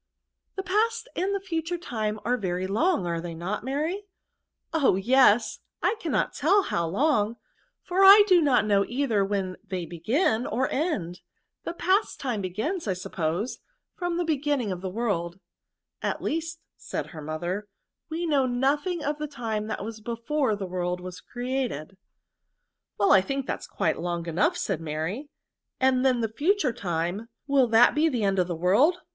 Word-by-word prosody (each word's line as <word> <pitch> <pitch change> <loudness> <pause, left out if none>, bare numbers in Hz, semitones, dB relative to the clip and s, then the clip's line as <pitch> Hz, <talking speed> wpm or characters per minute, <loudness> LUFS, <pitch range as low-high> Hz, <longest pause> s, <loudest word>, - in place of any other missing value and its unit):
The 385 - -3
past 445 +6 0
and 385 +3 0
the - - -1
future 345 -2 -3
time 215 -9 -3
are 245 - +2
very 185 -5 -2
long, 220 - +1
are 170 -1 -2
they 170 -1 -6
not, 180 +6 -4
Mary? 315 - -2 0.3
" - - -55 0.3
Oh! 285 - +3
yes; 230 +2 +4 0.2
I - - +3
cannot 325 -9 0
teU 385 +8 +3
how 170 - -1
long, 220 - +1 0.5
for 370 +2 +2
I 400 +2 +10
do 365 -4 +5
not 275 -7 +3
know 200 -2 +3
either 240 -5 +1
when 195 -2 -2
they 180 -3 -4
begin 220 - 0
or 255 +4 0
end. 215 - -2 0.4
The - - -4
past 385 +5 +1
time 245 -6 -2
begins, 220 - -3
I 190 - +1
suppose, 180 +4 -3 0.3
from 350 -1 -2
the 350 - 0
be 315 -4 0
ginning 280 -7 0
of 180 -1 -4
the 190 - -3
world." 185 -5 -2 0.7
•*At - - -1
least," 325 +1 -3 0.2
said - - -4
her 155 - -7
mother, 175 +7 -4 0.4
"we 330 +2 -2
know 280 -5 +2
nothing 290 +7 0
of 295 +1 -2
the 300 - -3
time 225 -6 -3
that 215 -2 -4
was 220 -1 -7
before 235 +2 -1
the 200 -1 -5
world 180 0 -2
was 180 0 -8
created. 245 - -4 0.5
" - - -56
Well 200 -1 +3
I 195 - +7
think 275 +6 -3
that - - -3
is - - -10
quite - - -1
long 170 -1 -2
enough," 250 - +1
said 190 - -2
Mary; 165 - -4 0.5
'^and 260 -1 +3
then 255 -3 +3
the 225 -1 -2
future 310 - +2
time, 175 +4 -3 0.2
will 275 -3 +3
that 225 +1 +6
be 305 +1 +2
to - - +4
the 245 -7 -1
end 195 -1 +2
of 180 - +2
the 175 - -3
world? 205 - +3
235 Hz, 180 wpm, -26 LUFS, 185-305 Hz, 0.7 s, I